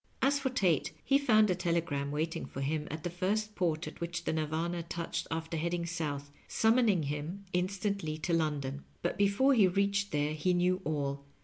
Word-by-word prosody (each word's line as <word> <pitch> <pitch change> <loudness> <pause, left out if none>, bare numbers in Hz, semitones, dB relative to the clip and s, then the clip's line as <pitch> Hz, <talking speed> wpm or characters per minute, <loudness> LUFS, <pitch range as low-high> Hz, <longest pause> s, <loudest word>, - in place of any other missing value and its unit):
As 280 +1 +3
for 270 -1 0
Tate, 185 - +1
he 275 0 +4
found 215 -7 +4
a - - +4
telegram 170 -5 -1
waiting 155 +3 -2
for 135 - -6
him 150 +2 -1
at 155 +1 -5
the 175 - -1
first 210 +4 -1
port 170 -5 0
at - - -9
which 175 +1 -3
the - - -1
Nirvana 160 +2 -1
touched 170 0 -4
after 160 0 -3
heading 170 +2 -1
south, 145 -5 -3 0.2
summoning 220 -6 +3
him 150 +7 -4
instantly 185 -3 -1
to 165 +2 -2
London. 145 -4 -1 0.2
But 175 - 0
before 205 +8 +4
he 215 -7 +6
reached 200 +2 +1
there 150 -1 0
he 180 +4 +1
knew 180 +1 +2
all. 140 -2 -2
170 Hz, 185 wpm, -32 LUFS, 155-200 Hz, 0.2 s, he